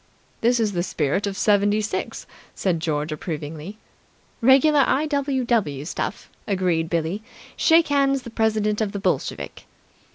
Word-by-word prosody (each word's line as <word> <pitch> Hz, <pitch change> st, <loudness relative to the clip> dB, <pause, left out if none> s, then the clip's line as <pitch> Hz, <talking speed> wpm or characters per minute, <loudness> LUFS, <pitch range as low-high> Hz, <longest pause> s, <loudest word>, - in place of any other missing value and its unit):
"This 240 Hz, +1 st, +3 dB
is 220 Hz, -2 st, +1 dB
the 175 Hz, -, 0 dB
spirit 170 Hz, +2 st, -1 dB
of 195 Hz, -1 st, -4 dB
'76!" 205 Hz, +1 st, +1 dB, 0.3 s
said 180 Hz, -4 st, 0 dB
George 155 Hz, -1 st, -2 dB
approvingly. 155 Hz, +4 st, -6 dB, 0.6 s
"Regular 275 Hz, +5 st, +5 dB
I.W.W. 260 Hz, -, 0 dB
stuff," -, -, -4 dB, 0.2 s
agreed 180 Hz, -5 st, 0 dB
Billie. 170 Hz, +4 st, -1 dB, 0.3 s
"Shake 325 Hz, -1 st, +4 dB
hands 275 Hz, -2 st, +2 dB
the 235 Hz, -, -9 dB
President 215 Hz, -1 st, 0 dB
of 210 Hz, -2 st, -1 dB
the 200 Hz, -, -3 dB
Bolsheviki!" 195 Hz, -, -2 dB
205 Hz, 125 wpm, -23 LUFS, 165-245 Hz, 0.6 s, Regular